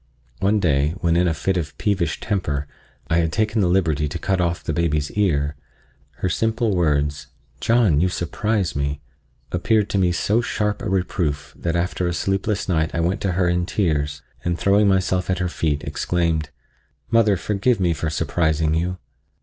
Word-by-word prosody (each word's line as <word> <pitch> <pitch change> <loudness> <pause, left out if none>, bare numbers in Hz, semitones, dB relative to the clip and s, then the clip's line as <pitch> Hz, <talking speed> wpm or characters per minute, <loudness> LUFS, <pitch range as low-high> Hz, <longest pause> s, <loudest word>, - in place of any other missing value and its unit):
One 105 +2 +2
day, 75 -3 +1
when 85 -1 +2
in 90 +1 +3
a 85 - +2
fit 95 +6 0
of 75 -4 -4
peevish 95 -6 0
temper, 75 -8 -2 0.4
I 80 - +1
had 80 -1 +1
taken 110 +3 +1
the 95 - +3
liberty 85 -5 +1
to 75 - -4
cut 95 +1 0
off 85 -1 -1
the 80 - -2
baby's 75 -2 0
ear, 75 -8 +1 0.6
her 80 - -3
simple 110 +3 0
words, 75 -4 0 0.3
"John, 110 -11 +3
you 95 - +3
surprise 100 +2 -1
me!" 70 0 -1 0.5
appeared 105 +4 +1
to 100 - +1
me 90 -2 +3
so 105 +6 +1
sharp 105 -3 -1
a 115 - -3
reproof 85 -6 -1
that 85 0 -2
after 90 +1 0
a 85 - -1
sleepless 95 +3 -1
night 80 -4 0
I - - 0
went 85 +4 0
to 95 -2 0
her 90 0 +2
in 90 0 +1
tears, 75 -7 -1 0.2
and 85 0 -1
throwing 100 +2 +3
myself 95 -1 +1
at 95 - +1
her 90 0 -1
feet, 75 -4 -1
exclaimed: 85 -3 -1 0.6
"Mother, 110 -4 +4
forgive 105 +5 0
me 90 -3 +2
for 80 0 -2
surprising 80 0 0
you." 90 +3 -1
90 Hz, 180 wpm, -22 LUFS, 80-100 Hz, 0.6 s, Mother